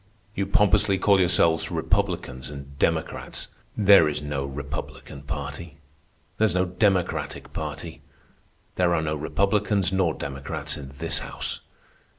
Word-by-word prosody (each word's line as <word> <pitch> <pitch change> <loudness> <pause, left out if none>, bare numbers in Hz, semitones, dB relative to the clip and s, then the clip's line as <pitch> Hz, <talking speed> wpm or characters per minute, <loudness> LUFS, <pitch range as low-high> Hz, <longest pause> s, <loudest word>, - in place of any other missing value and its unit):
You 100 -2 -1
pompously 100 -1 +4
call 100 0 +4
yourselves 85 -3 +3
Republicans 65 +1 -1
and 70 -1 -9
Democrats. - - -1 0.3
There 100 -6 +7
is 75 0 -2
no 75 -2 -3
Republican 70 0 -6
Party. 75 +2 -6 0.6
There 110 - +5
is 100 - +1
no 90 0 +3
Democratic 95 0 0
Party. - - -6 0.8
There 90 -1 +3
are 80 - 0
no 75 -1 -1
Republicans 100 +4 +1
nor 95 -4 +2
Democrats 70 0 -4
in 65 -2 -8
this - - -1
House. - - -4
85 Hz, 130 wpm, -25 LUFS, 70-95 Hz, 0.8 s, There